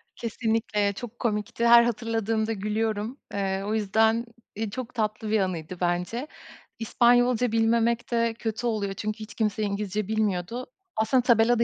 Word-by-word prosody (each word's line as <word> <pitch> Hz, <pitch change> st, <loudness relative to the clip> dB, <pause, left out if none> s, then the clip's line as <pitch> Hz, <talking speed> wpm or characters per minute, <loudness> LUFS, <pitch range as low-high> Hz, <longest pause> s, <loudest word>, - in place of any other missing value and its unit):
Kesinlikle 220 Hz, -3 st, -1 dB
çok 240 Hz, +3 st, -9 dB
komikti, 220 Hz, +1 st, 0 dB
her 235 Hz, 0 st, +9 dB
hatırladığımda 225 Hz, -1 st, -1 dB
gülüyorum. 215 Hz, +3 st, -2 dB, 0.2 s
Eee, 195 Hz, -1 st, -1 dB
o 210 Hz, -, -1 dB
yüzden, 220 Hz, +2 st, +2 dB, 0.3 s
iii, 220 Hz, +1 st, -2 dB
çok 255 Hz, +1 st, -6 dB
tatlı 215 Hz, -1 st, -2 dB
bir 215 Hz, 0 st, +3 dB
anıydı 180 Hz, -2 st, -3 dB
bence. 180 Hz, +10 st, -1 dB, 0.5 s
İspanyolca 245 Hz, +1 st, +3 dB
bilmemek 230 Hz, +1 st, +2 dB
de 230 Hz, -1 st, +2 dB
kötü 225 Hz, +1 st, -2 dB
oluyor. 205 Hz, -4 st, -1 dB
Çünkü 215 Hz, +2 st, -4 dB
hiç 215 Hz, 0 st, -8 dB
kimse 215 Hz, -1 st, 0 dB
İngilizce 205 Hz, 0 st, -2 dB
bilmiyordu. 215 Hz, +2 st, -1 dB, 0.3 s
Aslında 220 Hz, +4 st, +3 dB
tabelada 235 Hz, 0 st, +4 dB
220 Hz, 140 wpm, -26 LUFS, 210-235 Hz, 0.5 s, her